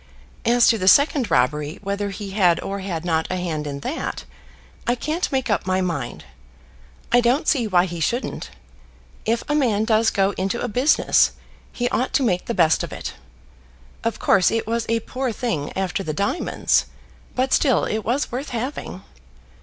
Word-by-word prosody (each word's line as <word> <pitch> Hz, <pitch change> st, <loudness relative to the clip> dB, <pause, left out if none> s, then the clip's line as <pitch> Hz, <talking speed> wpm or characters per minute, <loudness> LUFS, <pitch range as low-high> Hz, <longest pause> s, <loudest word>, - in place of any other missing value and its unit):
As 240 Hz, +1 st, +5 dB
to 225 Hz, -, +3 dB
the 185 Hz, -, -1 dB
second 280 Hz, 0 st, +5 dB
robbery, 150 Hz, +2 st, +1 dB
whether 200 Hz, +1 st, -2 dB
he 195 Hz, 0 st, -6 dB
had 180 Hz, -4 st, +3 dB
or 200 Hz, 0 st, -4 dB
had 175 Hz, -4 st, -4 dB
not 160 Hz, -2 st, 0 dB
a 185 Hz, -, -1 dB
hand 160 Hz, -5 st, -3 dB
in 140 Hz, -1 st, -5 dB
that, 300 Hz, -, -4 dB, 0.6 s
I 240 Hz, -, +3 dB
can't 310 Hz, +8 st, -2 dB
make 265 Hz, -2 st, 0 dB
up 205 Hz, -3 st, 0 dB
my 185 Hz, 0 st, +1 dB
mind. 165 Hz, -, -3 dB, 0.9 s
I 245 Hz, +1 st, +5 dB
don't 245 Hz, +5 st, +1 dB
see 250 Hz, -7 st, +2 dB
why 180 Hz, -3 st, +3 dB
he 170 Hz, -2 st, -6 dB
shouldn't. 235 Hz, -, -2 dB, 0.8 s
If 230 Hz, +1 st, 0 dB
a 295 Hz, -, 0 dB
man 230 Hz, -8 st, +2 dB
does 225 Hz, 0 st, +3 dB
go 195 Hz, 0 st, +1 dB
into 195 Hz, +5 st, -1 dB
a -, -, -2 dB
business, 250 Hz, +7 st, +3 dB, 0.4 s
he 245 Hz, -, -1 dB
ought 255 Hz, +1 st, -1 dB
to 275 Hz, -, +3 dB
make 180 Hz, -7 st, 0 dB
the 235 Hz, -, -3 dB
best 160 Hz, -3 st, +3 dB
of -, -, -5 dB
it. -, -, -6 dB, 0.9 s
Of 230 Hz, -1 st, -1 dB
course, 185 Hz, -2 st, +4 dB
it 225 Hz, 0 st, -1 dB
was 230 Hz, +1 st, -2 dB
a 230 Hz, 0 st, +1 dB
poor 255 Hz, +2 st, -3 dB
thing 210 Hz, -, -3 dB
after 190 Hz, 0 st, -1 dB
the 155 Hz, -5 st, -3 dB
diamonds; 200 Hz, -, +1 dB, 0.5 s
but 260 Hz, +1 st, +1 dB
still 260 Hz, -5 st, +3 dB
it 215 Hz, -, -1 dB
was 240 Hz, +7 st, -1 dB
worth 260 Hz, +5 st, -4 dB
having. 250 Hz, +4 st, -5 dB
215 Hz, 180 wpm, -22 LUFS, 180-245 Hz, 0.9 s, As